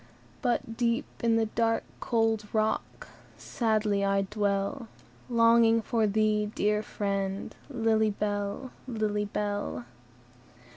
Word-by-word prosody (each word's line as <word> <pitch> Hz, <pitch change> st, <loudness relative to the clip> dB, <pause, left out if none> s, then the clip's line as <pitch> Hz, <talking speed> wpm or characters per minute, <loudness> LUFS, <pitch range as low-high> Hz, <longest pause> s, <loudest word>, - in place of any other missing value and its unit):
"But, 230 Hz, -2 st, -1 dB
deep 235 Hz, +3 st, +1 dB, 0.2 s
in 230 Hz, -1 st, +4 dB
the 225 Hz, 0 st, +3 dB
dark, 225 Hz, +1 st, 0 dB, 0.2 s
cold 225 Hz, -3 st, +1 dB
rock, 220 Hz, 0 st, -1 dB, 0.3 s
Sadly 215 Hz, -3 st, 0 dB
I 195 Hz, 0 st, +2 dB
dwell, 205 Hz, +4 st, -1 dB, 0.4 s
Longing 230 Hz, -1 st, +5 dB
for 225 Hz, 0 st, +1 dB
thee, 210 Hz, 0 st, +1 dB
dear 210 Hz, 0 st, +2 dB
friend, 195 Hz, -2 st, -3 dB
Lily 225 Hz, -4 st, +2 dB
Bell! 205 Hz, +4 st, -3 dB, 0.2 s
Lily 215 Hz, -3 st, -1 dB
Bell!" 205 Hz, -11 st, -3 dB
215 Hz, 105 wpm, -29 LUFS, 205-230 Hz, 0.4 s, Longing